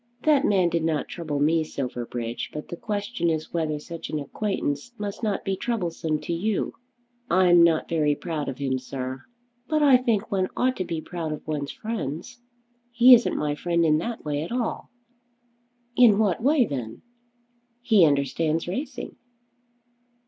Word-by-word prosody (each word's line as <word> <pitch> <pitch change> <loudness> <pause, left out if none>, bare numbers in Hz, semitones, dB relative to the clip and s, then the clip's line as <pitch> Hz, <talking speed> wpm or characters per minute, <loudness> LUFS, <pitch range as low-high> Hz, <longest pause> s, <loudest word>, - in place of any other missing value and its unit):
"That 295 -3 +4
man 185 -4 +3
did 170 -1 -1
not 160 -2 -1
trouble 155 -5 -4
me, 160 +2 +3
Silverbridge; 120 -4 -4
but 150 - -7
the - - -4
question 205 -3 -2
is 160 -1 -3
whether 160 -3 -1
such 165 +3 -8
an 155 - -2
acquaintance 145 - -3
must 205 0 -5
not 210 -3 -1
be 195 - 0
troublesome 170 -8 -2
to 170 - -3
you." 200 +5 -1 0.6
"I'm 175 -1 +5
not 170 -2 +4
very 150 -3 +1
proud 155 -4 -4
of 130 - -6
him, 135 -2 -1
sir." 130 0 -5 0.5
"But 310 -1 +1
I 275 -3 +7
think 230 -4 -1
one 190 -2 +1
ought 255 +1 +2
to 185 - -2
be 165 -2 -3
proud 165 -2 -4
of 150 - -8
one's 145 -2 -3
friends." 220 - -5 0.5
"He 240 +2 +8
isn't 240 0 +4
my 150 -1 0
friend 170 +2 0
in 155 -1 +3
that 230 +3 -5
way 145 -1 -1
at 165 - -5
all." 240 -2 -2 1.1
"In 235 -5 +6
what 210 -2 +1
way 275 0 +4
then?" 125 - -6 0.8
"He 215 -7 +5
understands 155 +2 +1
racing." 255 +7 -5
170 Hz, 165 wpm, -25 LUFS, 150-220 Hz, 1.1 s, He